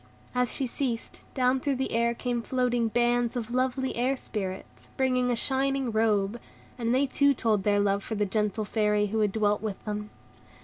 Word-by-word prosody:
As 250 Hz, -1 st, +1 dB
she 270 Hz, -, 0 dB
ceased, 245 Hz, -2 st, -3 dB
down 255 Hz, 0 st, +3 dB
through 280 Hz, +1 st, 0 dB
the 265 Hz, +1 st, -2 dB
air 235 Hz, +1 st, +1 dB
came 240 Hz, -1 st, -2 dB
floating 245 Hz, -1 st, +1 dB
bands 240 Hz, +1 st, +1 dB
of 240 Hz, -1 st, -3 dB
lovely 260 Hz, +1 st, 0 dB
Air 255 Hz, +3 st, +1 dB
Spirits, 190 Hz, -6 st, -6 dB
bringing 255 Hz, -1 st, +2 dB
a 245 Hz, -, +2 dB
shining 270 Hz, +1 st, 0 dB
robe, 215 Hz, 0 st, +1 dB, 0.4 s
and 235 Hz, -2 st, -1 dB
they 260 Hz, +3 st, +3 dB
too 280 Hz, +1 st, +3 dB
told 220 Hz, -4 st, +1 dB
their 205 Hz, +1 st, +2 dB
love 200 Hz, 0 st, +1 dB
for 220 Hz, -, -4 dB
the 210 Hz, 0 st, +1 dB
gentle 210 Hz, +1 st, -1 dB
Fairy 210 Hz, -1 st, +1 dB
who 215 Hz, +2 st, -1 dB
had 210 Hz, -2 st, +2 dB
dwelt 210 Hz, -1 st, +1 dB
with 215 Hz, -3 st, -5 dB
them. 210 Hz, 0 st, -4 dB
235 Hz, 185 wpm, -28 LUFS, 210-255 Hz, 0.4 s, down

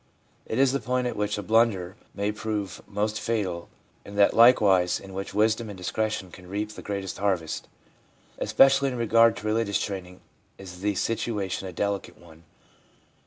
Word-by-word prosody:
It 110 Hz, -, -3 dB
is 135 Hz, -1 st, +4 dB
the 140 Hz, -, 0 dB
point 125 Hz, -1 st, -1 dB
at 125 Hz, -, -2 dB
which 105 Hz, 0 st, -1 dB
a 105 Hz, -, -4 dB
blunder 105 Hz, -4 st, +2 dB, 0.2 s
may 100 Hz, +1 st, -1 dB
prove 105 Hz, -5 st, -4 dB
most 105 Hz, +1 st, -2 dB
fatal, 95 Hz, -7 st, -2 dB, 0.3 s
and 100 Hz, 0 st, -10 dB
that 100 Hz, -, +5 dB
likewise 105 Hz, -7 st, +5 dB
in 95 Hz, 0 st, -11 dB
which 95 Hz, +1 st, -6 dB
wisdom 110 Hz, +1 st, +2 dB
and 100 Hz, -, -8 dB
discretion 95 Hz, 0 st, -2 dB
can 90 Hz, 0 st, -13 dB
reap 105 Hz, +2 st, -3 dB
the -, -, -10 dB
greatest 100 Hz, -2 st, -5 dB
harvest. 90 Hz, -5 st, -1 dB, 0.7 s
Especially 135 Hz, 0 st, +4 dB
in 125 Hz, -, -4 dB
regard 115 Hz, 0 st, +4 dB
to -, -, -8 dB
religious 110 Hz, -1 st, +1 dB
training 90 Hz, -2 st, -5 dB, 0.4 s
is 90 Hz, -2 st, -10 dB
the 105 Hz, 0 st, 0 dB
situation 105 Hz, -3 st, -2 dB
a -, -, -6 dB
delicate 100 Hz, +2 st, -3 dB
one. 85 Hz, -1 st, -17 dB
105 Hz, 165 wpm, -26 LUFS, 95-110 Hz, 0.7 s, that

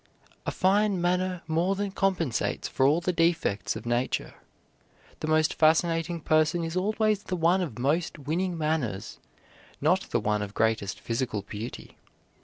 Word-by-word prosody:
A -, -, +1 dB
fine 200 Hz, +1 st, +2 dB
manner 180 Hz, 0 st, 0 dB
more 170 Hz, +5 st, +1 dB
than 200 Hz, 0 st, -2 dB
compensates 185 Hz, -, 0 dB
for 130 Hz, -, +2 dB
all 155 Hz, +5 st, +3 dB
the 180 Hz, +1 st, 0 dB
defects 165 Hz, -, +1 dB
of -, -, -7 dB
nature. 120 Hz, +2 st, -1 dB, 0.9 s
The -, -, -4 dB
most 155 Hz, 0 st, +3 dB
fascinating 165 Hz, +1 st, +2 dB
person 155 Hz, +3 st, +2 dB
is 165 Hz, +1 st, -4 dB
always 215 Hz, +2 st, +1 dB
the 185 Hz, -, -4 dB
one 175 Hz, +2 st, +3 dB
of 145 Hz, -11 st, -4 dB
most 155 Hz, +8 st, 0 dB
winning 170 Hz, +5 st, -2 dB
manners, 150 Hz, -11 st, -2 dB, 0.6 s
not 180 Hz, +6 st, +1 dB
the 120 Hz, -, +1 dB
one 105 Hz, -1 st, 0 dB
of 105 Hz, 0 st, -6 dB
greatest 110 Hz, -3 st, 0 dB
physical 115 Hz, -3 st, -2 dB
beauty. 105 Hz, +4 st, -8 dB
165 Hz, 150 wpm, -27 LUFS, 125-180 Hz, 0.9 s, all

